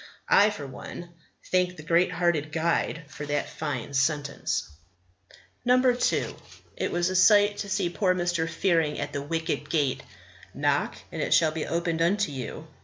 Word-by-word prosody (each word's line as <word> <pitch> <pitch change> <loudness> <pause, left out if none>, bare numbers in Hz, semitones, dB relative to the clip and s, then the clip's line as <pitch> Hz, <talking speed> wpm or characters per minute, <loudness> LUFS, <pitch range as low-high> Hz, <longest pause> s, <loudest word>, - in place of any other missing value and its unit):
I, 205 +1 +6
for 180 -9 -6
one, 170 +6 -9 0.4
thank 180 -1 +1
the 150 - -9
great 170 +3 +3
hearted 160 -4 0
guide 165 0 0
for 150 0 -8
that 145 0 -1
fine 145 -3 -4
sentence. 140 0 0 1.0
2. 250 0 +2 0.4
It - - -2
was 175 +1 0
a - - -3
sight 205 +2 +5
to 200 - -4
see 175 - 0
poor 185 0 +1
Mr. 175 -2 0
Fearing 165 -5 +1
at 145 0 -4
the 145 - -2
wicket 160 +3 -3
gate. 145 -5 0 0.5
"Knock, - - +1 0.2
and - - -4
it - - +3
shall 160 -2 +4
be 155 0 -4
opened 170 -1 -1
unto 195 +1 +2
you." 135 +3 -6
165 Hz, 160 wpm, -27 LUFS, 150-180 Hz, 1.0 s, I